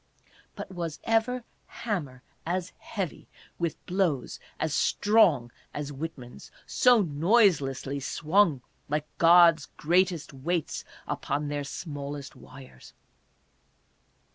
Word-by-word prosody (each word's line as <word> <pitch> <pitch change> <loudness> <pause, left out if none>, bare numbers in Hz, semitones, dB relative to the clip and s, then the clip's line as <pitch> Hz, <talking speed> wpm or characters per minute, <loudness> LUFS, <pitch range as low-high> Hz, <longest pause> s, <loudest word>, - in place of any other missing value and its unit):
But - - -7
was 170 -4 -5
ever 230 +2 +1 0.2
hammer 145 - -4 0.2
as 180 +1 -3
heavy, 195 -7 -5 0.3
with 170 -2 -3
blows 175 -9 -1 0.2
as 155 -1 -1
strong 175 - +3 0.2
as 145 0 -4
Whitman's, 135 -4 -8 0.2
so 245 -4 +4
noiselessly 145 - +2
swung, 155 +1 +2 0.3
like 150 +1 -1
God's 170 -2 +6
greatest 170 -2 +1
weights 160 +4 -2 0.2
upon 145 +1 -2
their 145 0 -2
smallest 140 -2 -6
wires 130 - -14
160 Hz, 95 wpm, -28 LUFS, 140-185 Hz, 0.3 s, God's